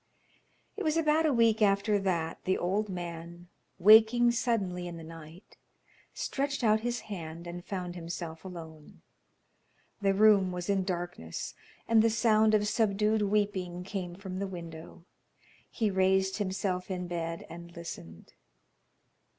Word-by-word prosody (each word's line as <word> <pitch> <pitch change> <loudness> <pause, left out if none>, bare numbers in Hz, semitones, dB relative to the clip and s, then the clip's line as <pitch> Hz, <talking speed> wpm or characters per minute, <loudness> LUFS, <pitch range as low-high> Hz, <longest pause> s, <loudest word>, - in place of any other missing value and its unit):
It - - -4
was 315 -1 +1
about 315 0 +3
a - - +3
week 230 -3 +3
after 205 0 +3
that 170 -4 -1
the 185 - +2
old 200 +4 -1
man, 170 -1 -7 0.3
waking 220 +5 +7
suddenly 200 -7 -1
in 170 -1 -7
the 165 - -9
night, 165 +2 -12 0.5
stretched 275 -1 -2
out 215 -1 +4
his 240 +1 -2
hand 170 -4 -7
and 175 0 -7
found 180 -2 -4
himself 165 -1 -6
alone. 160 -5 -10 1.0
The 195 -1 +2
room 200 -3 +5
was 180 +2 -2
in 195 -2 +1
darkness, 175 - -4 0.3
and 225 -1 +5
the 230 - +4
sound 220 -1 +4
of 210 0 +2
subdued 215 0 +2
weeping 200 -4 0
came 180 -2 -5
from 190 -1 -6
the 200 - -2
window. 170 -2 -9 0.6
He 220 -4 0
raised 190 0 +2
himself 185 -2 -2
in 180 -1 -3
bed 165 -1 -4
and 170 0 -10
listened. 85 - -9
190 Hz, 140 wpm, -30 LUFS, 175-215 Hz, 1.0 s, waking